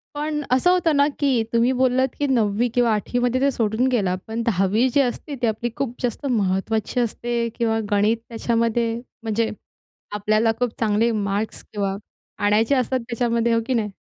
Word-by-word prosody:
पण 300 Hz, 0 st, -2 dB
असं 260 Hz, +8 st, +4 dB
होतं 345 Hz, -4 st, +2 dB
ना, 285 Hz, 0 st, +4 dB
की 265 Hz, -5 st, +2 dB
तुम्ही 235 Hz, +2 st, +3 dB
बोललात, 260 Hz, 0 st, +2 dB
की 290 Hz, -, +1 dB
9वी 230 Hz, -3 st, +2 dB
किंवा 240 Hz, -2 st, +3 dB
8वी 215 Hz, +3 st, -1 dB
मध्ये 245 Hz, +1 st, +1 dB
ते 280 Hz, 0 st, +3 dB
सोडून 225 Hz, +1 st, 0 dB
गेला. 195 Hz, -7 st, +1 dB
पण 225 Hz, +1 st, -3 dB
10वी 210 Hz, +2 st, +2 dB
जी 285 Hz, -, +5 dB
असते 270 Hz, +3 st, -3 dB
ती 240 Hz, -, +2 dB
आपली 220 Hz, +2 st, -1 dB
खूप 245 Hz, -3 st, -3 dB
जास्त 245 Hz, +3 st, -2 dB
महत्त्वाची 215 Hz, +1 st, 0 dB
असते. 235 Hz, 0 st, -1 dB
किंवा 225 Hz, -2 st, +1 dB
गणित 205 Hz, +3 st, +3 dB
त्याच्यामध्ये 230 Hz, 0 st, 0 dB, 0.3 s
म्हणजे 225 Hz, 0 st, 0 dB, 0.7 s
आपल्याला 215 Hz, +2 st, +2 dB
खूप 245 Hz, -1 st, +1 dB
चांगले 225 Hz, +1 st, +2 dB
मार्क्स 205 Hz, 0 st, -2 dB
तेव्हा 200 Hz, -2 st, -3 dB, 0.5 s
आणायचे 220 Hz, +6 st, +3 dB
असतात 260 Hz, 0 st, 0 dB
त्याच्यामध्ये, 235 Hz, -1 st, +1 dB
हो 230 Hz, -, +2 dB
की 260 Hz, -, +1 dB
नाही? 220 Hz, -3 st, 0 dB
235 Hz, 170 wpm, -22 LUFS, 215-250 Hz, 0.7 s, जी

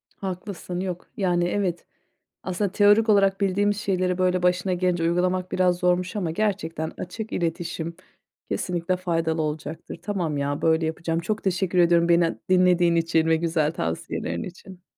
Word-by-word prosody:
Haklısın 185 Hz, -1 st, -5 dB
yok. 180 Hz, -2 st, -4 dB
Yani, 175 Hz, -3 st, +1 dB
evet, 180 Hz, -2 st, -1 dB, 0.6 s
aslında 185 Hz, +1 st, -2 dB
teorik 205 Hz, +2 st, +5 dB
olarak 195 Hz, -2 st, +4 dB
bildiğimiz 200 Hz, +1 st, +1 dB
şeyleri, 185 Hz, -3 st, 0 dB
böyle, 185 Hz, 0 st, +1 dB
başına 180 Hz, +1 st, +1 dB
gelince 180 Hz, -1 st, 0 dB
uygulamak 180 Hz, +2 st, 0 dB
biraz 180 Hz, -1 st, +2 dB
zormuş 180 Hz, +3 st, +1 dB
ama 180 Hz, -6 st, -1 dB
gerçekten 165 Hz, -4 st, -2 dB
açık 215 Hz, +5 st, -6 dB
iletişim 170 Hz, -1 st, -3 dB, 0.5 s
kesinlikle 180 Hz, 0 st, -1 dB
faydalı 165 Hz, -3 st, -1 dB
olacaktır. 155 Hz, +1 st, -5 dB
Tamam, 175 Hz, -8 st, -2 dB
ya 140 Hz, +1 st, -2 dB
böyle 160 Hz, 0 st, +3 dB
yapacağım. 165 Hz, +1 st, -2 dB
Çok 210 Hz, +6 st, -3 dB
teşekkür 185 Hz, -1 st, 0 dB
ediyorum 170 Hz, -1 st, +4 dB
beni 170 Hz, -1 st, +3 dB
dinlediğin 180 Hz, -2 st, +4 dB
için 165 Hz, -1 st, +2 dB
ve 160 Hz, 0 st, +4 dB
güzel 160 Hz, -2 st, 0 dB
tavsiyelerin 85 Hz, -, -3 dB
için. 185 Hz, 0 st, -10 dB
180 Hz, 145 wpm, -24 LUFS, 165-185 Hz, 0.6 s, teorik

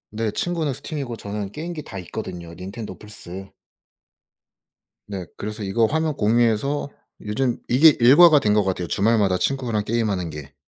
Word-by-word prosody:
네 110 Hz, 0 st, -2 dB
친구는 165 Hz, +3 st, -1 dB
스팀이고 135 Hz, -3 st, -5 dB
저는 100 Hz, -1 st, -5 dB
게임기 165 Hz, 0 st, -6 dB
다 100 Hz, -, -8 dB
있거든요, 90 Hz, -2 st, -7 dB
닌텐도, 95 Hz, +1 st, -8 dB
플스. 95 Hz, -2 st, -10 dB, 1.6 s
네. 95 Hz, -3 st, -5 dB
그래서 105 Hz, +1 st, -5 dB
이거 100 Hz, +4 st, +2 dB
화면 155 Hz, +3 st, 0 dB
공유해서 120 Hz, +6 st, +1 dB, 0.3 s
요즘 120 Hz, +4 st, -1 dB
이게 145 Hz, +5 st, +6 dB
일과가 150 Hz, +5 st, +8 dB
된 105 Hz, -4 st, +1 dB
것 105 Hz, -, +3 dB
같아요, 90 Hz, -2 st, -2 dB
주말마다 100 Hz, +1 st, +2 dB
친구랑 120 Hz, -4 st, -1 dB
게임하는 105 Hz, -7 st, -1 dB
게. 75 Hz, -3 st, -9 dB
110 Hz, 330 characters per minute, -23 LUFS, 95-135 Hz, 1.6 s, 일과가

